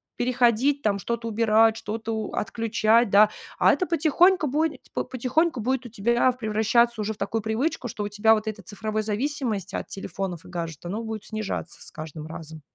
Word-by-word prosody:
переходить 250 Hz, +3 st, +2 dB
там, 210 Hz, -5 st, +1 dB
что-то 230 Hz, +3 st, -3 dB
убирать, 225 Hz, 0 st, +3 dB
что-то 225 Hz, +1 st, -4 dB
у 215 Hz, -2 st, -4 dB
отключать, 225 Hz, 0 st, +2 dB
да, 210 Hz, +1 st, +7 dB, 0.3 s
а -, -, +6 dB
это 365 Hz, -, +1 dB
потихоньку 335 Hz, +2 st, +3 dB
будет 300 Hz, 0 st, 0 dB
потихоньку 255 Hz, +4 st, 0 dB
будет 260 Hz, +2 st, -1 dB
у -, -, -7 dB
тебя 235 Hz, +4 st, +2 dB
превращаться 235 Hz, 0 st, +1 dB
уже 215 Hz, +1 st, -1 dB
в -, -, -17 dB
такую 225 Hz, 0 st, -2 dB
привычку, 240 Hz, +5 st, -1 dB
что 210 Hz, -, -5 dB
у 205 Hz, -, -3 dB
тебя 210 Hz, +2 st, +4 dB
вот 215 Hz, 0 st, -1 dB
эта 215 Hz, -2 st, -5 dB
цифровой 215 Hz, +3 st, -3 dB
зависимость 215 Hz, -, -2 dB
от -, -, -4 dB
телефонов 190 Hz, -3 st, -5 dB
и -, -, -12 dB
гаджетов, 170 Hz, -1 st, -5 dB
оно 220 Hz, +3 st, -3 dB
будет 220 Hz, -2 st, -5 dB
снижаться 215 Hz, -6 st, -5 dB
с -, -, -10 dB
каждым 155 Hz, 0 st, -8 dB
разом. 160 Hz, -1 st, -9 dB
220 Hz, 180 wpm, -25 LUFS, 205-245 Hz, 0.3 s, да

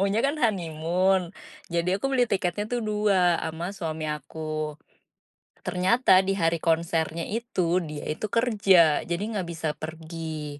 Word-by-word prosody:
maunya 200 Hz, +2 st, +1 dB
kan 280 Hz, +2 st, +2 dB
honeymoon. 180 Hz, -2 st, +1 dB, 0.4 s
Jadi 170 Hz, +2 st, 0 dB
aku -, -, 0 dB
beli 255 Hz, -2 st, +3 dB
tiketnya 190 Hz, +1 st, 0 dB
tuh 245 Hz, -1 st, 0 dB
dua 205 Hz, -5 st, +2 dB
sama 160 Hz, +2 st, -4 dB
suami 160 Hz, -2 st, -4 dB
aku. 155 Hz, +1 st, -4 dB, 0.9 s
Ternyata 185 Hz, +1 st, +4 dB
di 195 Hz, +1 st, 0 dB
hari 165 Hz, 0 st, +2 dB
konsernya 165 Hz, 0 st, 0 dB
itu, 185 Hz, -6 st, 0 dB
dia 150 Hz, -2 st, -7 dB
itu 155 Hz, +7 st, -3 dB
kerja, 195 Hz, -9 st, +4 dB
jadi 170 Hz, +3 st, -3 dB
ga 190 Hz, -, -1 dB
bisa 160 Hz, -3 st, -3 dB
pergi. 160 Hz, -2 st, -6 dB
170 Hz, 135 wpm, -26 LUFS, 160-195 Hz, 0.9 s, Ternyata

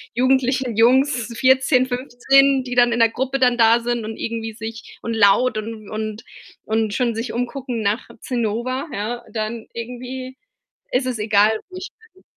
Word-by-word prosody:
jugendlichen 255 Hz, -2 st, +1 dB
Jungs, 250 Hz, 0 st, +3 dB
14, 260 Hz, -1 st, +4 dB
15, 265 Hz, +2 st, +2 dB
die 250 Hz, -1 st, -5 dB
dann 240 Hz, -1 st, +5 dB
in 235 Hz, -, -1 dB
der 230 Hz, -1 st, +5 dB
Gruppe 265 Hz, +2 st, -2 dB
dann 250 Hz, -1 st, +3 dB
da 230 Hz, +1 st, +5 dB
sind 240 Hz, -2 st, -2 dB
und 220 Hz, 0 st, -5 dB
irgendwie 225 Hz, -1 st, -4 dB
sich 225 Hz, +1 st, -9 dB
und 230 Hz, -, -3 dB
laut 215 Hz, +3 st, +4 dB
und 215 Hz, -1 st, -6 dB
und 215 Hz, +1 st, -5 dB, 0.4 s
und 220 Hz, -1 st, 0 dB
schon 235 Hz, -2 st, 0 dB
sich 230 Hz, 0 st, -4 dB
umgucken 245 Hz, -1 st, -3 dB
nach 210 Hz, +4 st, -1 dB
Zinnober, 250 Hz, +3 st, -2 dB
ja, 225 Hz, +4 st, -4 dB
dann 220 Hz, +1 st, -4 dB
irgendwie 255 Hz, +2 st, -7 dB, 0.5 s
ist 255 Hz, +1 st, +1 dB
es 240 Hz, -4 st, -3 dB
egal, 210 Hz, +1 st, +3 dB
wo 370 Hz, -, -9 dB
ich 375 Hz, -, -6 dB, 0.2 s
bin. 375 Hz, -, -23 dB
240 Hz, 165 wpm, -21 LUFS, 225-255 Hz, 0.5 s, dann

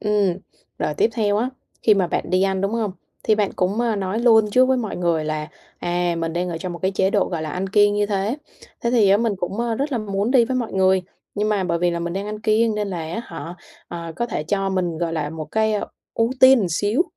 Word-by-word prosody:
Ừm, 205 Hz, -4 st, +1 dB, 0.4 s
rồi 150 Hz, -, -1 dB
tiếp 225 Hz, -, +2 dB
theo 205 Hz, -3 st, +1 dB
á, 240 Hz, +4 st, 0 dB, 0.3 s
khi 215 Hz, -, +5 dB
mà 190 Hz, -3 st, +2 dB
bạn 170 Hz, -, -3 dB
đi 185 Hz, +1 st, +3 dB
ăn, 190 Hz, -1 st, +1 dB
đúng 195 Hz, +2 st, -1 dB
hông? 220 Hz, -5 st, -1 dB, 0.3 s
Thì 215 Hz, -, +3 dB
bạn 210 Hz, -2 st, 0 dB
cũng, 195 Hz, +4 st, 0 dB
a, 235 Hz, -3 st, +1 dB
nói 195 Hz, +2 st, -2 dB
luôn 225 Hz, -3 st, +5 dB
trước 255 Hz, +4 st, +5 dB
với 260 Hz, 0 st, +2 dB
mọi 225 Hz, -4 st, -3 dB
người 170 Hz, -3 st, 0 dB
là, 155 Hz, 0 st, -3 dB, 0.3 s
à, 175 Hz, 0 st, 0 dB
mình 165 Hz, 0 st, -2 dB
đang 180 Hz, +1 st, -1 dB
ở 165 Hz, -, -4 dB
trong 180 Hz, +1 st, -5 dB
một 170 Hz, -, -7 dB
cái 190 Hz, -, +2 dB
chế 190 Hz, 0 st, +1 dB
độ, 205 Hz, -1 st, +2 dB
gọi 165 Hz, -3 st, -3 dB
là, 155 Hz, -, -4 dB
ăn 185 Hz, +4 st, -3 dB
kiêng 205 Hz, 0 st, +4 dB
như 205 Hz, 0 st, +1 dB
thế. 205 Hz, +4 st, -1 dB, 0.4 s
Thế 235 Hz, -, 0 dB
thì 220 Hz, -5 st, +4 dB
á, 200 Hz, -, +6 dB
mình 230 Hz, 0 st, +1 dB
cũng 180 Hz, 0 st, -3 dB, 0.3 s
rất 280 Hz, +1 st, -1 dB
là 240 Hz, -, 0 dB
muốn 200 Hz, +1 st, -1 dB
đi 255 Hz, -3 st, +5 dB
với 255 Hz, +2 st, -2 dB
mọi 235 Hz, -3 st, -2 dB
người, 190 Hz, 0 st, +3 dB, 0.3 s
nhưng 210 Hz, +1 st, 0 dB
mà 205 Hz, -3 st, +1 dB
bởi 170 Hz, -2 st, 0 dB
vì 175 Hz, 0 st, +2 dB
là 170 Hz, -, -2 dB
mình 170 Hz, 0 st, -3 dB
đang 195 Hz, +2 st, -3 dB
ăn 210 Hz, 0 st, -5 dB
kiêng 220 Hz, 0 st, +2 dB
nên 210 Hz, -1 st, -2 dB
là 180 Hz, -3 st, -4 dB
á 165 Hz, +7 st, -4 dB
hả, 170 Hz, -2 st, -7 dB, 0.3 s
ờ, 170 Hz, -1 st, -6 dB
có 240 Hz, -, -1 dB
thể 180 Hz, -9 st, -3 dB
cho 195 Hz, +3 st, 0 dB
mình, 175 Hz, -4 st, -1 dB
gọi 170 Hz, -1 st, -1 dB
là, 150 Hz, -2 st, -2 dB
một 160 Hz, 0 st, -5 dB
cái, 220 Hz, 0 st, +2 dB
ơ, 205 Hz, -, -2 dB, 0.3 s
ưu 230 Hz, +1 st, +1 dB
tiên 260 Hz, -8 st, +7 dB
xíu 205 Hz, -, +1 dB
195 Hz, 265 wpm, -22 LUFS, 175-220 Hz, 0.4 s, tiên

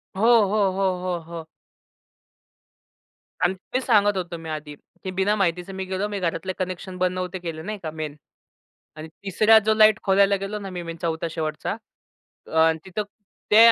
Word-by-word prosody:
हो, 195 Hz, -, -3 dB, 0.3 s
हो, 205 Hz, -2 st, +2 dB
हो, 190 Hz, 0 st, +1 dB
हो, 180 Hz, -2 st, -1 dB
हो. 165 Hz, -1 st, -6 dB, 2.0 s
आणि 180 Hz, +1 st, +3 dB, 0.2 s
तेच 255 Hz, 0 st, 0 dB
सांगत 205 Hz, -4 st, +4 dB
होतो 175 Hz, -2 st, -4 dB
मी 165 Hz, -1 st, -8 dB
आधी 150 Hz, -1 st, -5 dB, 0.3 s
की 185 Hz, -, -3 dB
बिना 195 Hz, +3 st, +1 dB
माहितीचे 180 Hz, -1 st, 0 dB
मी 190 Hz, 0 st, -4 dB
गेलो, 190 Hz, +2 st, -2 dB
मी 205 Hz, -1 st, -4 dB
घरातले 185 Hz, +2 st, -2 dB
कनेक्शन 185 Hz, 0 st, -4 dB
बंद 185 Hz, 0 st, +1 dB
नव्हते 185 Hz, 0 st, -3 dB
केले, 165 Hz, -3 st, -5 dB
नाही 210 Hz, +5 st, -5 dB
का 155 Hz, -, -3 dB
मेन 155 Hz, -2 st, -5 dB, 0.8 s
आणि 155 Hz, +1 st, -8 dB, 0.2 s
तिसरा 215 Hz, +3 st, +6 dB
जो 220 Hz, -, +4 dB
लाईट 215 Hz, 0 st, +6 dB
खोलायला 200 Hz, 0 st, +4 dB
गेलो 195 Hz, +2 st, -4 dB
ना, 195 Hz, -2 st, -7 dB
मी 180 Hz, -1 st, -5 dB
मी 165 Hz, 0 st, -6 dB
चौथा 165 Hz, 0 st, -1 dB
शेवटचा 155 Hz, +5 st, -3 dB, 0.8 s
अ, 160 Hz, 0 st, +5 dB
तिथं 190 Hz, +3 st, -3 dB, 0.5 s
ते 210 Hz, -, +7 dB
185 Hz, 170 wpm, -24 LUFS, 165-200 Hz, 2.0 s, ते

